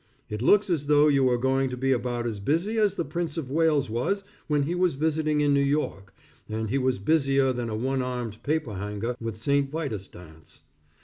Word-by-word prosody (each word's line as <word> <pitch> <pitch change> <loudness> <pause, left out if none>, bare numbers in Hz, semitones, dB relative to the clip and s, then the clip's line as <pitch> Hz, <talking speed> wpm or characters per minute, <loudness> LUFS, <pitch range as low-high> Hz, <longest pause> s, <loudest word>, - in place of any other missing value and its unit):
It 105 +1 -3
looks 205 - +4
as 145 -4 -1
though 150 0 +5
you 140 -2 +3
were 125 -1 +3
going 135 +1 +1
to 125 - -5
be 135 +1 0
about 120 -1 -1
as 110 -3 -3
busy 170 - 0
as 205 -2 +2
the 170 - -2
Prince 170 +2 -3
of 135 -5 -4
Wales 155 -3 +2
was 125 - -1 0.2
when 150 -2 +2
he 160 +5 -1
was 180 -4 +1
visiting 155 0 +1
in 145 -1 +3
New 140 - +3
York, 140 -9 -1 0.3
and 110 0 -3
he 140 - +1
was 130 -1 +1
busier 135 +3 +2
than 120 -2 -3
a 110 - -3
one 130 +3 -1
armed 125 -4 -4
paper 150 -6 -1
hanger 105 +5 -3
with 115 -2 -4
St. 140 +4 +1
Vitus 135 - -4
dance. 80 -3 -15
135 Hz, 210 wpm, -26 LUFS, 115-150 Hz, 0.3 s, though